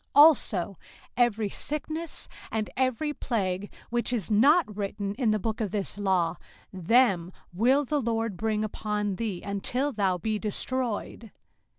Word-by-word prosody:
05:028:061 290 - +11
Also 200 - +2 0.4
every 225 -4 +2
sickness, 310 +3 -3 0.2
and 220 -1 -2
every 260 +4 0
plague, 200 -7 -2 0.2
which 240 0 0
is 225 -6 -2
not 265 - +4
written 200 0 -3
in 240 0 0
the 215 - +3
book 220 +2 -3
of 210 - 0
this 200 0 -3
law, 180 -4 +1 0.4
them 190 -2 +3 0.2
will 255 +9 +3
the 295 +2 0
LORD 225 -3 -1
bring 215 +2 0
upon 210 -2 -2
thee, 210 -6 -3
until 245 +8 -1
thou 195 -6 +1
be 215 +3 -1
destroyed. 230 +1 -3
215 Hz, 145 wpm, -28 LUFS, 200-250 Hz, 0.4 s, 05:028:061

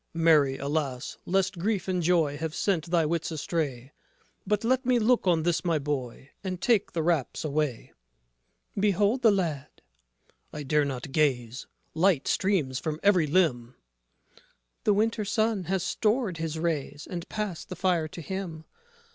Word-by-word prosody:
JOSEPH 165 - -2
Mary, 145 -5 +5
alas, 140 -3 -3
lest 190 -1 +1
grief 195 0 -1
and 185 -1 0
joy 165 -4 +2
Have 160 +2 -4
sent 180 -6 0
thy 170 -2 +2
wits 165 +1 -1
astray; 145 -5 -3 0.6
But 210 +1 +1
let 255 +3 +2
me 250 -1 +3
look 235 -2 +2
on 165 -3 +3
this 170 -1 +1
my 170 -3 +1
boy, 135 -3 -4
And 185 -2 -3
take 230 -1 +2
the 165 - -1
wraps 160 -3 0
away. 150 -5 -2 0.8
MARY - - -2
Behold 205 +6 +2
the 230 - +6
lad. 165 -8 0
JOSEPH - - -32 0.7
I - - -4
dare 150 +1 +2
not 135 -1 -5
gaze: 130 -5 0 0.3
Light 165 -3 +2
streams 155 -10 +1
from 155 -1 -3
every 185 -6 +4
limb. 155 -6 +3
MARY 120 +2 -18 1.1
The 210 - +5
winter 220 +1 +1
sun 215 -1 0
has 190 +1 -1
stored 210 -1 0
his 160 -1 -3
rays, 155 -3 -3
And 175 -2 -6
passed 210 -6 -4
the 185 - -5
fire 175 -3 +1
to 170 - -9
him. 170 -2 -5
165 Hz, 165 wpm, -27 LUFS, 150-195 Hz, 1.1 s, the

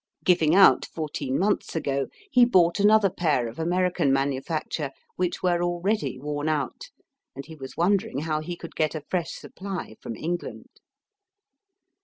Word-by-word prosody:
Giving 170 -3 +4
out 195 0 +6
fourteen 145 -4 -3
months 200 -1 0
ago, 140 -3 -1 0.2
he 250 - +6
bought 180 -6 +4
another 205 -1 +5
pair 155 -10 +1
of 115 +5 -9
American 175 -2 +1
manufacture, 140 +2 -1 0.3
which 180 0 -2
were 175 -1 +2
already 175 - -1
worn 145 +2 -3
out, 145 -5 -3 0.5
and 140 +1 -7
he 160 - -11
was 135 -2 -10
wondering 195 +1 +1
how 155 -1 -1
he 175 +3 -5
could 170 -1 -10
get 155 0 0
a 155 - -4
fresh 175 -3 -1
supply 190 - -7
from 115 - -6
England. 175 +6 -5
165 Hz, 150 wpm, -25 LUFS, 145-180 Hz, 0.5 s, out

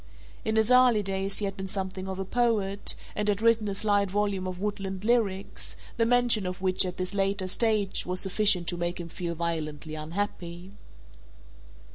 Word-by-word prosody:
In 220 - -1
his 220 +2 +3
early 250 -4 +5
days 195 0 -2
he 210 - -1
had 195 -1 -3
been 190 -1 -5
something 190 -1 -4
of 190 -1 -4
a 190 - -3
poet, 210 -3 0 0.2
and 210 - -1
had 205 -1 +2
written 225 -1 +3
a 200 - -2
slight 205 -1 +2
volume 200 -1 -1
of 180 -1 -5
"Woodland 195 -1 -4
Lyrics," 210 -5 0 0.2
the 230 -1 +2
mention 240 -5 +3
of 180 0 -5
which 185 0 +2
at 180 - -6
this 185 +1 -3
later 195 -1 0
stage 210 0 +1
was 180 +1 -1
sufficient 195 -2 +5
to 175 - -3
make 175 +1 -2
him 170 -1 -6
feel 170 0 -4
violently 155 -2 -3
unhappy. 175 +2 -5
195 Hz, 180 wpm, -27 LUFS, 185-210 Hz, 0.2 s, early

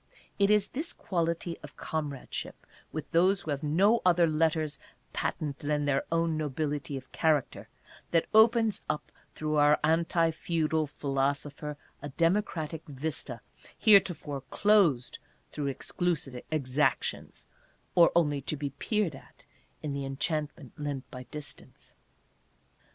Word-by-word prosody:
It 200 0 +4
is 210 -1 +3
this 305 +6 -4
quality 170 -1 -2
of - - -12
comradeship 145 -4 -5 0.3
with 155 -2 -6
those 185 +4 +4
who 155 - -4
have 140 -1 -2
no 190 +10 +3
other 175 -1 +5
letters 155 -2 +1 0.3
patent 145 -3 -2
than 150 0 0
their 140 -1 +1
own 165 -1 +1
nobility 145 -1 -2
of 130 0 -11
character 155 -4 0 0.4
that 165 -1 +3
opens 225 0 +5
up 150 - -3 0.2
through 155 0 -1
our 145 0 +5
anti 165 +1 +3
feudal 160 -1 0
philosopher 145 +1 -2 0.2
a 145 - -5
Democratic 165 -1 0
Vista 135 -4 -4 0.4
heretofore 180 -9 +4
closed 190 - +3 0.3
through 145 -2 -3
exclusive 140 -2 -2
exactions, 140 -2 -1 0.5
or 170 -1 +6
only 145 -4 +2
to 150 +3 -3
be 140 -1 -3
peered 200 - -1
at, 135 -2 -15 0.4
in 150 -2 -2
the 140 0 -3
en 135 0 -5
chantment 150 -3 -2
lent 145 -3 -4
by 125 0 -8
distance. 150 +1 -9
155 Hz, 130 wpm, -29 LUFS, 145-170 Hz, 0.5 s, or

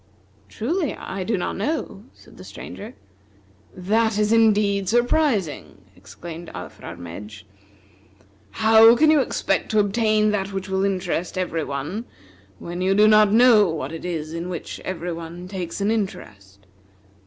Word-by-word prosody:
"Truly 305 - -2
I 190 0 -6
do 215 +2 -1
not 175 - -3
know," 215 -3 -3
said - - -19
the - - -11
Stranger. 220 +5 -10 0.8
"This 215 +4 +1
is 210 +1 +2
indeed 205 -3 +3
surprising!" 240 - 0 0.2
exclaimed 170 0 -10
Alfrarmedj. 100 +5 -9 1.1
"How 225 +1 +6
can 310 +5 +4
you 310 - +5
expect - - -1
to 215 - +2
obtain 215 +1 +2
that 200 -1 -2
which 190 -1 -5
will 190 0 0
interest 185 -2 -2
every 170 -3 -2
one, 150 - -5 0.5
when 175 - -6
you 190 +1 +2
do 210 +1 +6
not 215 -1 +5
know 225 -3 +6
what 150 -3 -4
it 165 - -7
is 160 -3 -4
in 170 +2 -5
which 175 -3 -6
every 175 -1 -5
one 170 +2 -8
takes 185 -1 -5
an 205 +2 +1
interest? 100 - -5
195 Hz, 140 wpm, -22 LUFS, 170-220 Hz, 1.1 s, How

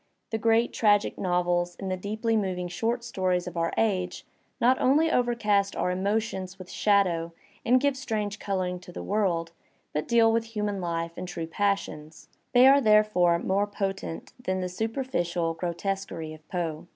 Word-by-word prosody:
The 220 - -1
great 230 +2 +2
tragic 205 -2 +2
novels 175 -1 0
and 190 -2 -4
the - - +1
deeply 220 +4 -1
mov 190 -4 0
ing 180 -1 -4
short 225 +7 -1
stories 185 -6 -1
of 180 -1 -7
our 165 0 0
age 185 -5 0 0.3
not 255 +2 +3
only 305 +5 +4
overcast 215 -6 +1
our 180 - 0
emotions 195 0 -2
with 185 -1 -10
shadows 185 -5 +2 0.3
and 250 +2 +4
give 280 0 +1
strange 215 -6 -3
colouring 185 -2 -2
to 180 0 -12
the - - -7
world, 180 -5 0 0.4
but 150 - -2
deal 230 -1 +5
with 225 0 -2
human 205 -2 -1
life 170 -1 -2
and 180 - -5
true 170 -2 -4
passions; 165 -4 -3 0.2
they 250 +1 +6
are 275 +1 +7
therefore 210 -6 +4
more 195 +4 0
potent 195 -4 -4
than 185 -3 -1
the 180 0 -2
superficial 180 -6 -1
grotesquery 170 -1 -4
of 155 0 -15
Poe. 170 -3 -3
195 Hz, 165 wpm, -27 LUFS, 175-220 Hz, 0.4 s, are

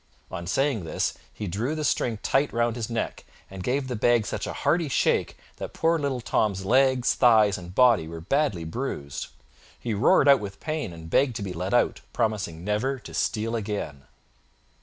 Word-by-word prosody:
On 85 0 -5
saying 135 0 +1
this, 80 - -1 0.2
he 105 - -6
drew 110 - -2
the 155 - -3
string 120 -5 0
tight 140 +2 +2
round 120 -1 0
his 115 -2 -4
neck, 115 -1 -3 0.3
and 95 -1 -7
gave 130 +4 0
the 125 - -3
bag 115 0 +3
such - - -3
a - - -3
hearty 165 -2 +2
shake - - +1 0.2
that - - -7
poor 165 0 +2
little 140 -4 -2
Tom's 95 -1 0
legs, 130 +2 +3
thighs 110 -5 +5
and 90 -1 -9
body 120 -10 +5
were 80 0 -8
sadly 135 - +1
bruised. 80 - -4 0.5
He 115 - -3
roared 110 +6 +4
out 140 -1 +7
with 100 -2 -7
pain 155 - -3
and 80 -1 -10
begged 125 +8 +2
to 105 - -4
be 95 -2 -4
let 90 +6 -2
out, 120 - +2
promising 105 -8 -1
never 110 +7 0
to 125 - -12
steal 115 +2 -1
again. 100 -11 -4
115 Hz, 185 wpm, -26 LUFS, 95-130 Hz, 0.5 s, out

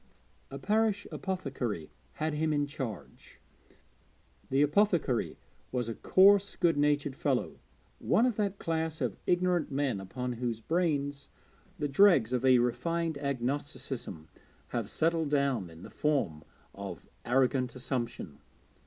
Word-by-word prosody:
A 140 - -6
parish 210 +5 +1
apothecary 135 - -3 0.2
had 155 0 -2
him 155 +1 0
in 145 -1 +1
charge. 130 - -8 1.1
The 135 +2 +3
apothecary 155 - +1 0.3
was 125 -2 -1
a - - -2
coarse 200 - +5
good 170 -3 +2
natured 145 -1 +1
fellow, 135 -3 -1 0.4
one 230 - +3
of 250 -4 +1
that 200 -2 0
class 160 -2 -2
of 125 -8 -1
ignorant 180 -2 +2
men 135 -6 0
upon 125 +6 -4
whose 120 -3 -1
brains 145 -1 -1 0.5
the 150 - -1
dregs 140 - +5
of 125 - 0
a 130 -1 +6
refined 160 +6 0
agnosticism 135 - -3 0.4
have 115 -3 -3
settled 165 -1 +1
down 140 - +1
in 80 +2 -13
the - - -10
form 110 - 0 0.3
of 100 -3 -7 0.2
arrogant 125 0 +1
assumption. 120 - -4
140 Hz, 125 wpm, -30 LUFS, 125-165 Hz, 1.1 s, a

